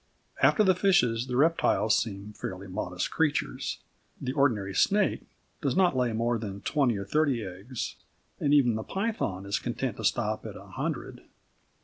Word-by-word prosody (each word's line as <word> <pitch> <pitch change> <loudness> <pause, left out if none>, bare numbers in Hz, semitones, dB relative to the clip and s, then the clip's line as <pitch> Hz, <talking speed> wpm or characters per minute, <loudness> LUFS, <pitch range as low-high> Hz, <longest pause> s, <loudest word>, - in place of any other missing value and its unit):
After 215 - +5
the 190 -2 +5
fishes, 130 - +2
the 125 -1 -2
reptiles 145 -7 +3
seem 105 -1 -3
fairly 95 -1 -6
modest 90 -2 -3
creatures. 150 -3 -1 0.4
The 130 - -3
ordinary 115 -9 +1
snake 205 - +2 0.3
does - - 0
not 185 -6 +4
lay 125 -2 +1
more 115 +1 0
than 100 -2 -6
twenty 130 -3 +1
or 100 - -4
thirty 140 -1 +1
eggs, 95 +7 -6 0.4
and 145 - +1
even 135 -5 +5
the 110 - -2
python 190 - -2
is 100 +1 -1
content 120 -1 -3
to 110 - -6
stop 110 +1 0
at - - -8
a - - -12
hundred. - - -4
120 Hz, 160 wpm, -28 LUFS, 100-145 Hz, 0.4 s, After